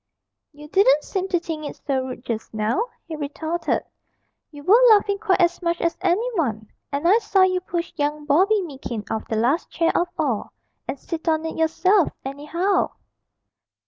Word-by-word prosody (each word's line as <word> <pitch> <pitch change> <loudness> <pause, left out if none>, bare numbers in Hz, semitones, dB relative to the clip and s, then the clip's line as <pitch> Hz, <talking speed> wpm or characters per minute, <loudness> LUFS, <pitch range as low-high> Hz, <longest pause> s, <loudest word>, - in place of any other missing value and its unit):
'You 295 0 -12
didn't 300 -4 +4
seem 380 -1 -3
to 360 -2 +1
think 325 -2 -5
it - - -10
so 270 -3 0
rude 255 -1 -8
just 225 -1 -4
now,' 220 - 0 0.2
he 325 - -5
retorted; 315 +3 -2 0.7
'you 290 -2 -12
were 425 +9 +6
laughing 405 -2 +4
quite 405 -4 +1
as 345 0 +2
much 340 -1 0
as 335 - 0
any 385 +6 +1
one; 225 - -2 0.2
and 285 +4 0
I 415 +6 +6
saw 390 -4 +3
you 370 -1 +2
push 345 -1 -4
young 295 0 -1
Bobby 380 +8 +3
Meekin 265 -8 -6
off 220 - -3
the 220 - -2
last 245 +9 +1
chair 330 0 +1
of 350 - +2
all, - - -1 0.3
and - - -3
sit 330 +4 -6
on 315 0 +1
it 320 - -4
yourself, 340 +4 +3 0.2
anyhow.' 320 +8 -1
330 Hz, 175 wpm, -23 LUFS, 285-370 Hz, 0.7 s, were